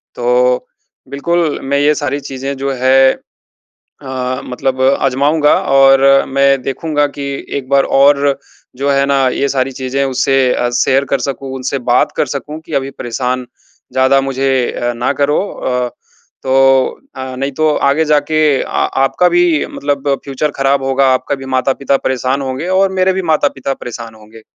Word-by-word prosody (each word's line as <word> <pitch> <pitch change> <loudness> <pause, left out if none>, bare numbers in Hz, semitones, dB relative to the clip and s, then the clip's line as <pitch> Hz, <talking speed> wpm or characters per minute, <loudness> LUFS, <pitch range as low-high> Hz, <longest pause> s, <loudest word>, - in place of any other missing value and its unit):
तो 125 +1 +1 0.4
बिल्कुल, 160 +2 -1
मैं 140 +1 0
ये 150 +1 +3
सारी 145 -1 -2
चीज़ें 135 0 -5
जो 135 0 -2
है 130 +1 +4 0.9
अ, 130 -2 -4
मतलब 130 +1 -3
अजमाऊँगा 140 +3 +2 0.2
और 135 0 +6 0.3
मैं 135 0 +2
देखूँगा 145 +3 -1
कि 140 0 -8 0.3
एक 130 -2 -6
बार 140 0 +4
और 140 0 +4 0.4
जो 140 +3 -2
हैं 140 0 +2
ना 135 -1 +2
ये 140 +2 -1
सारी 135 0 -1
चीजें 130 +1 -2
उससे 135 +1 0 0.2
अ, 120 - -1
शेयर 135 +3 +1
कर 140 - +1
सकूँ, 135 +1 -5
उनसे 130 +1 -3
बात - - +3
कर - - +1
सकूँ 145 +4 -6
कि 160 - -10
अभी 135 0 -6
परेशान 125 0 -3 0.5
ज्यादा 130 +1 +3
मुझे 135 0 -1 0.2
अ, 120 0 -2
ना 120 +1 -1
करो 145 +1 +2
अ, 125 -1 -2 0.5
तो 135 0 +3 0.2
अ, 130 -1 -6
नहीं 135 +2 -3
तो 155 0 +3 0.2
आगे 155 +3 +1
जाके 150 +1 +1 0.2
अ, - - -5
आपका 135 +7 +1
भी 175 -3 +2
मतलब 140 0 -3
फ्यूचर 140 +2 -2
ख़राब 135 0 +1
होगा, 135 0 +2
आपका 130 +2 -1
भी 135 0 -10
माता-पिता 135 +1 +1
परेशान 130 +1 -1
होंगे 135 +5 -4
और 195 0 +2
मेरे 185 0 +3
भी 190 - -2
माता-पिता 135 -3 0
परेशान 115 -3 -8
होंगे। 110 +1 -16
135 Hz, 160 wpm, -14 LUFS, 130-140 Hz, 0.9 s, और